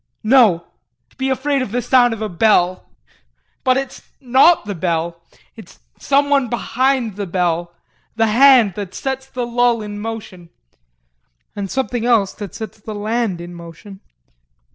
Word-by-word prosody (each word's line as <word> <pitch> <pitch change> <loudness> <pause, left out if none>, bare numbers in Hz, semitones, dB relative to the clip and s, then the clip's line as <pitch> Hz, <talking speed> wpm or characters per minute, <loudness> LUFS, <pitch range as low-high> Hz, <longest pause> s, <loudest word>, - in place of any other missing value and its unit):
No! 215 -8 +4 0.5
To - - -27
be 265 0 -2
afraid 275 +1 0
of 255 - -4
the 245 - -1
sound 245 0 +3
of 225 -1 -4
a - - -1
bell! 185 -1 +1 0.8
But 255 0 +3
it's 270 -1 -5 0.2
not 265 +6 +4
the 205 - -4
bell 170 -1 -2 0.3
it's 220 -6 -14 0.2
someone 280 -1 +2
behind 245 -2 -1
the 200 -2 -4
bell, 175 -1 -1 0.4
the 225 0 +2
hand 235 -2 +5
that 200 -1 -7
sets 265 0 -4
the 250 -2 -4
bell 240 0 +1
in 205 0 -7
motion 210 -6 -7 1.1
and 200 -2 -4
something 255 -1 -2
else 230 -5 +2
that 205 -4 -9
sets 220 -1 -8
the 210 0 -7
hand 215 -3 -1
in 175 +1 -9
motion. 170 +3 -12
220 Hz, 150 wpm, -18 LUFS, 190-255 Hz, 1.1 s, hand